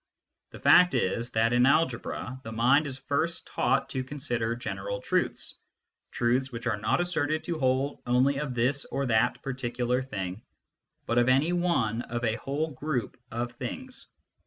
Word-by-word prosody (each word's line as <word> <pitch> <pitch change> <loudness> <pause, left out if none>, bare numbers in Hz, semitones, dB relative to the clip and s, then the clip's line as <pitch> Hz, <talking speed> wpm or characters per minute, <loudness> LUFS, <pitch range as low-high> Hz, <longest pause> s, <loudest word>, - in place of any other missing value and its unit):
The - - -11
fact 180 -5 +6
is, 115 +1 0
that 115 +1 +2
in 125 +1 +5
algebra 130 -3 0
the 115 - -7
mind 130 +7 +3
is 135 -2 -5
first 155 +5 -1
taught - - +1
to 130 - -2
consider 120 -4 -2
general 100 -4 -4
truths, - - -1 0.5
truths 125 +3 0
which 115 0 -7
are 110 -4 0
not 105 +9 +1
asserted 155 -3 0
to 170 -2 -3
hold 135 +1 0
only 130 +3 +3
of 145 -4 -3
this 130 +4 +2
or 140 - -2
that 120 0 +1
particular 125 -1 -1
thing, 95 -6 -5 0.6
but 115 +1 +2
of 120 +1 +3
any 140 +7 +3
one 150 -11 +1
of 120 0 -5
a 115 -1 +1
whole 150 +4 -2
group 140 -4 -3
of 120 +1 -3
things. 255 - -7
130 Hz, 160 wpm, -28 LUFS, 115-140 Hz, 0.6 s, fact